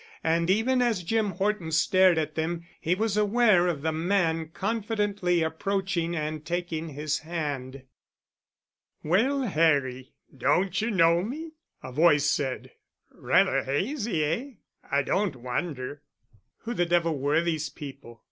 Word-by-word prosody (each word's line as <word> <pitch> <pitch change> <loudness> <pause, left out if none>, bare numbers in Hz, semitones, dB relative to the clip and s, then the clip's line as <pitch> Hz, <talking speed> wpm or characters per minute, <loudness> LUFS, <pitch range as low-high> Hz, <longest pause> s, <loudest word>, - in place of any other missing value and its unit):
And 165 +1 +1
even 240 +6 +2
as 230 -7 +1
Jim 220 +4 0
Horton 190 -2 -2
stared 185 +2 +4
at 155 -1 -1
them, 165 +2 -3
he 170 +3 0
was 215 +1 -1
aware 210 -4 +4
of 155 -5 -2
the 160 - +1
man 165 -1 0
confidently 205 -4 0
approaching 170 +1 -1
and 155 -1 -3
taking 170 -1 -3
his 150 +1 -2
hand. 145 -5 -5 1.2
"Well, 250 - +2
Harry, 145 - +1 0.2
don't 175 - +1
you 220 - -1
know 170 -4 +4
me?" 300 - -5 0.3
a 130 - -7
voice 150 +1 +4
said. 135 -3 -1 0.4
"Rather - - +2
hazy, 190 - -1
eh? 225 - -2 0.4
I 140 0 +2
don't 190 0 0
wonder...." 130 +2 -4 0.6
Who 235 - -3
the 175 -6 0
devil 170 -3 +1
were 145 +4 +2
these 160 -3 -1
people? 135 -5 -10
170 Hz, 135 wpm, -27 LUFS, 150-200 Hz, 1.2 s, stared